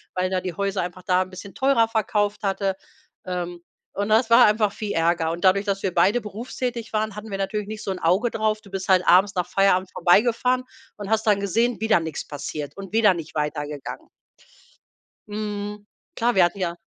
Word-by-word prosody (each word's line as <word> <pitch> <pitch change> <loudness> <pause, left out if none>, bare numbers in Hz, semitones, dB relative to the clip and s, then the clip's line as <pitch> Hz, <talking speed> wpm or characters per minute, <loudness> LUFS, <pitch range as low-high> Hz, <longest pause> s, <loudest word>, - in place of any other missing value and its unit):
weil 185 0 0
er 185 -1 0
die 180 -1 -4
Häuser 195 0 -1
einfach 180 +1 -6
da 180 +1 +2
'n 185 - -13
bisschen 190 +2 -10
teurer 265 -4 +3
verkauft 210 -2 0
hatte. 195 -1 0 0.5
Ähm, 175 -1 -4 0.3
und 205 +1 -2
das 225 +2 +3
war 230 - +8
einfach 210 -1 +2
viel 210 -2 -4
Ärger 165 0 +1
und 170 +1 -5
dadurch, 195 +2 +4
dass 195 -1 -2
wir 190 - -1
beide 190 +8 +3
berufstätig 230 +2 -5
waren, 215 -1 -1
hatten 210 +1 -8
wir 195 - -2
natürlich 195 +1 -3
nicht 215 0 -7
so 195 - -2
'n 185 - -4
Auge 190 +8 +2
drauf. 215 -1 0
Du 200 - -17
bist 195 -1 -5
halt 185 -1 +4
abends 190 +4 +5
nach 180 -1 -1
Feierabend 190 -1 +2
vorbeigefahren 235 +8 +3 0.3
und 205 -1 -7
hast 220 0 +1
dann 205 -2 +4
gesehen: 230 +5 0
„Wieder 220 -4 +3
nix 160 -2 -5
passiert 145 0 -6
und 195 0 -9
wieder 220 -3 +5
nicht 165 -3 -8
weitergegangen.“ 150 -1 -4 1.2
Mhm, 210 0 -5 0.3
klar, 240 +1 +1
wir 185 - +6
hatten 175 +3 -1
ja 175 -3 -2
200 Hz, 200 wpm, -23 LUFS, 180-215 Hz, 1.2 s, war